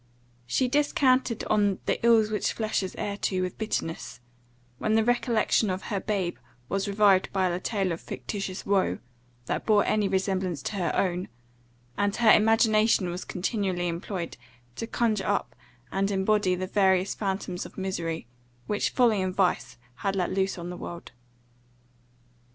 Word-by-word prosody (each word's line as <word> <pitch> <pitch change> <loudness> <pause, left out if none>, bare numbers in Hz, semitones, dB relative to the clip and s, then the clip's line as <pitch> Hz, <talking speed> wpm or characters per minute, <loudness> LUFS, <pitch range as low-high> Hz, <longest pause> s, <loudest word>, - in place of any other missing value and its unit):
She 255 - +1
descanted 260 -4 +2
on 205 -2 +2
"the - - -1
ills 225 -2 +5
which 210 - 0
flesh 220 -2 -1
is 190 - -5
heir 200 -1 -3
to," 185 -2 -1
with 180 - -5
bitterness, 165 - -3 0.6
when 215 0 +1
the 225 - +4
recollection 235 -3 +2
of 185 0 -3
her 200 - +1
babe 190 -4 -2 0.3
was 195 +1 -1
revived 200 -2 +3
by 190 -1 +1
a 175 0 -1
tale 195 -3 -1
of 165 - -4
fictitious 195 -3 -5
woe, 195 -1 +2 0.5
that - - -2
bore 210 -2 +4
any 210 -2 +2
resemblance 190 -5 -1
to 205 - -3
her 170 -5 0
own; 180 -1 0 0.7
and 205 0 +1
her 230 -2 +5
imagination 220 -2 +4
was 180 +2 -5
continually 185 -2 -2
employed, 170 +1 -4 0.4
to 230 - -4
conjure 225 -4 0
up 155 -12 -1 0.4
and 195 +1 0
embody 195 -1 +2
the 185 +1 -3
various 190 -1 +2
phantoms 190 -3 -3
of - - -19
misery, 170 -5 -3 0.4
which 210 - 0
folly 230 -6 +3
and 185 -1 -2
vice 185 -9 0 0.2
had 195 -1 -1
let 180 -2 0
loose 190 0 0
on 175 0 -6
the 180 - -7
world. 175 0 -8
195 Hz, 155 wpm, -27 LUFS, 185-215 Hz, 0.7 s, ills